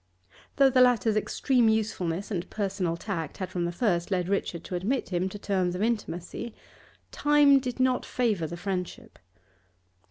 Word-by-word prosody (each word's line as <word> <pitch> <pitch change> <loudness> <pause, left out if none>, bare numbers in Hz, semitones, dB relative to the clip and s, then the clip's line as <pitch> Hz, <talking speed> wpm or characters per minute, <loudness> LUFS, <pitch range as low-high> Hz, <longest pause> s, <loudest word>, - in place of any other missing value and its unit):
Though 275 -1 +5
the 255 0 +4
latter's 235 -3 +4
extreme 235 +2 +2
usefulness 200 -4 -1
and 180 -3 -3
personal 195 -5 -2
tact 170 -5 -4
had 185 - -5
from 175 -1 -1
the 170 - -1
first 175 -3 0
led 185 -2 -1
Richard 180 -4 -2
to - - -8
admit 220 +9 -1
him 180 0 -1
to 205 - -8
terms 185 -3 -1
of 190 - -1
intimacy, 220 0 -3 0.6
time 290 -1 +5
did 255 -1 -5
not 255 -1 +2
favour 215 -10 0
the 170 - -7
friendship. 180 -1 -5
200 Hz, 160 wpm, -27 LUFS, 180-235 Hz, 0.6 s, Though